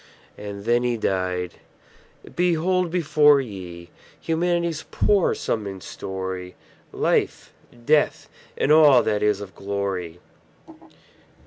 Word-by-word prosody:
And 100 Hz, -1 st, -8 dB
then 120 Hz, +1 st, +2 dB
he 120 Hz, -1 st, 0 dB
died! 90 Hz, -3 st, -2 dB, 0.8 s
Behold 180 Hz, +1 st, +1 dB
before 150 Hz, -4 st, +4 dB
ye 90 Hz, -8 st, -8 dB, 0.3 s
Humanity's 170 Hz, -1 st, -1 dB
poor 200 Hz, -3 st, +2 dB
sum 110 Hz, -3 st, -3 dB
and 95 Hz, -2 st, -8 dB
story; 95 Hz, -1 st, -6 dB, 0.4 s
Life, -, -, -1 dB, 0.3 s
Death, 150 Hz, +1 st, +2 dB, 0.3 s
and 145 Hz, -, +1 dB
all 150 Hz, -4 st, +7 dB
that 105 Hz, -1 st, 0 dB
is 105 Hz, -1 st, +1 dB
of 95 Hz, -2 st, -9 dB
glory. 95 Hz, -3 st, -4 dB
105 Hz, 105 wpm, -23 LUFS, 95-155 Hz, 0.8 s, all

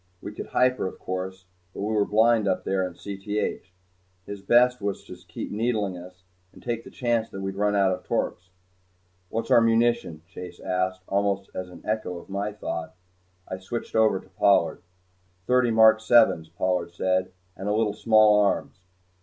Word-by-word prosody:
We -, -, -7 dB
could -, -, -7 dB
hyper, 125 Hz, -5 st, +1 dB
of -, -, -8 dB
course, 95 Hz, 0 st, -5 dB, 0.3 s
but -, -, -5 dB
we 110 Hz, +2 st, -1 dB
were 105 Hz, -1 st, +2 dB
blind 110 Hz, 0 st, +3 dB
up -, -, 0 dB
there 95 Hz, -1 st, 0 dB
in 90 Hz, -, -11 dB
Cth. 100 Hz, +3 st, -4 dB, 0.6 s
His 100 Hz, -1 st, -7 dB
best 125 Hz, +4 st, +4 dB
was 100 Hz, -1 st, -3 dB
to -, -, -10 dB
keep 90 Hz, 0 st, -8 dB
needling 105 Hz, -3 st, -1 dB
us, 90 Hz, +1 st, -12 dB, 0.3 s
and -, -, -17 dB
take 115 Hz, -1 st, -3 dB
the -, -, -11 dB
chance 115 Hz, -2 st, -1 dB
that 95 Hz, -, -8 dB
we'd 95 Hz, 0 st, -3 dB
run 105 Hz, +1 st, 0 dB
out 100 Hz, -2 st, +3 dB
of 90 Hz, -, -4 dB
torps. 90 Hz, +1 st, -3 dB, 0.8 s
"What's 115 Hz, 0 st, -3 dB
our 115 Hz, -, +7 dB
munition?" 115 Hz, -8 st, +1 dB
Chase 90 Hz, -1 st, -10 dB
asked 95 Hz, 0 st, -2 dB
almost 100 Hz, 0 st, -1 dB
as 90 Hz, -1 st, -5 dB
an 90 Hz, -, -13 dB
echo 100 Hz, -5 st, -3 dB
to -, -, -17 dB
my 100 Hz, +2 st, -2 dB
thought. 90 Hz, -6 st, -6 dB, 0.5 s
I 95 Hz, -, -5 dB
switched 115 Hz, +5 st, -6 dB
over 110 Hz, -3 st, +3 dB
to -, -, -18 dB
Pollard. 100 Hz, +1 st, +2 dB, 0.6 s
"Thirty 125 Hz, +1 st, +3 dB
mark 110 Hz, -1 st, +6 dB
sevens," 110 Hz, -8 st, +4 dB
Pollard 90 Hz, +1 st, -1 dB
said, 95 Hz, 0 st, 0 dB, 0.2 s
"and 95 Hz, +2 st, -4 dB
a -, -, +1 dB
little 110 Hz, -2 st, +1 dB
small 110 Hz, -1 st, +5 dB
arms." 100 Hz, -2 st, 0 dB
100 Hz, 180 wpm, -25 LUFS, 95-110 Hz, 0.8 s, our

